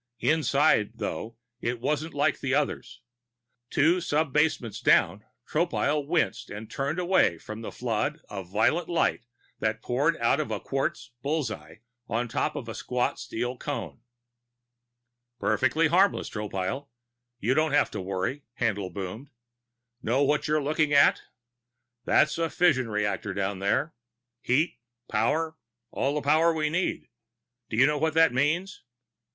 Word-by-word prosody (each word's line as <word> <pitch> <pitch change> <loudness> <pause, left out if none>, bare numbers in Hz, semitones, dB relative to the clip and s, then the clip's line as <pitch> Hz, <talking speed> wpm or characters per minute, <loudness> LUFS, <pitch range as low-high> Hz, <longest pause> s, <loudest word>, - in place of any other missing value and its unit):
Inside, 145 -8 +3
though, 115 0 -5 0.2
it 120 -1 -2
wasn't 150 +5 -2
like 145 0 +1
the 135 0 0
others. 145 -1 -2 0.7
Two 170 +5 +3
sub 155 -3 0
basements 150 -8 +1
down, 100 +5 +3 0.2
Tropile 150 -3 0
winced 155 - 0
and 105 +2 -8
turned 140 +4 -2
away 180 - +3
from 110 +6 -8
the 115 - -6
flood 125 +6 -2
of 95 -3 -7
violet 110 - +1
light 165 -7 0 0.3
that 110 0 -1
poured 145 +7 +1
out 115 +4 +2
of 155 - -2
a - - -2
quartz 135 -2 -3
bull's 145 -3 -1
eye 80 +2 -10 0.3
on 120 +2 -1
top - - -1
of - - -5
a - - -5
squat 125 -1 -1
steel 120 +2 -3
cone. 145 -5 -5 1.4
"Perfectly 155 +6 +2
harmless, 190 +5 +2
Tropile 105 +6 -3 0.5
you 120 +4 +1
don't 155 0 +2
have 145 - +3
to - - -4
worry," 95 +9 -2 0.2
Haendl 100 -5 0
boomed. 100 +8 -6 0.7
"Know 125 +5 +2
what 145 +1 +1
you're 150 -1 +1
looking 150 0 +1
at? 140 0 +5 0.8
There's 150 +2 +3
a 165 -1 +1
fusion 145 -10 +2
reactor 105 -2 -2
down 100 -1 -2
there. 130 +11 0 0.5
Heat. 145 +6 +1 0.3
Power. 160 +9 0 0.3
All 140 +2 -1
the 150 - -2
power 155 +4 +4
we 155 -1 0
need. 180 +3 -1 0.6
Do 110 - -3
you 130 - +7
know 150 0 +1
what 160 +1 0
that 160 -4 +5
means?" 160 +9 0
140 Hz, 145 wpm, -27 LUFS, 110-155 Hz, 1.4 s, you